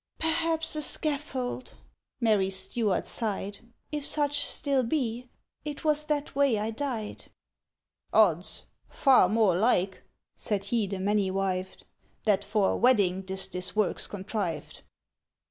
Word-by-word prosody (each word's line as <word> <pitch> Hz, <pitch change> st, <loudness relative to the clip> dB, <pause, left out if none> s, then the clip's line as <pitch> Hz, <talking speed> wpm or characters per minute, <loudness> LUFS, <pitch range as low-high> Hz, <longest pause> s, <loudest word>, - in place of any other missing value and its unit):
"—Perhaps 325 Hz, 0 st, +1 dB
a 305 Hz, -, -1 dB
scaffold!" 275 Hz, -4 st, -1 dB, 0.4 s
Mary 210 Hz, -5 st, +2 dB
Stuart 195 Hz, +1 st, -1 dB
sighed, 205 Hz, -3 st, -3 dB, 0.3 s
"If 300 Hz, -1 st, -3 dB
such 290 Hz, 0 st, +1 dB
still 280 Hz, -3 st, +1 dB
be. 245 Hz, -2 st, -2 dB, 0.3 s
It 295 Hz, -1 st, -6 dB
was 300 Hz, -1 st, +2 dB
that 300 Hz, -1 st, -2 dB
way 275 Hz, -5 st, +3 dB
I 215 Hz, +2 st, -2 dB
died." 225 Hz, -3 st, -4 dB, 0.9 s
"—Ods! 180 Hz, -5 st, +3 dB, 0.3 s
Far 260 Hz, -10 st, +5 dB
more 215 Hz, -4 st, +3 dB
like," 190 Hz, -2 st, +1 dB, 0.3 s
said 205 Hz, -2 st, -2 dB
he 215 Hz, 0 st, 0 dB
the 195 Hz, 0 st, -4 dB
many 200 Hz, 0 st, +1 dB
wived, 185 Hz, -1 st, -3 dB, 0.4 s
"That 205 Hz, -2 st, +2 dB
for 205 Hz, -1 st, +1 dB
a -, -, -1 dB
wedding 200 Hz, -7 st, +3 dB
'tis 190 Hz, 0 st, -2 dB
this 180 Hz, +1 st, -4 dB
work's 210 Hz, -3 st, +1 dB
contrived. 190 Hz, -5 st, -4 dB
220 Hz, 130 wpm, -28 LUFS, 195-280 Hz, 0.9 s, Far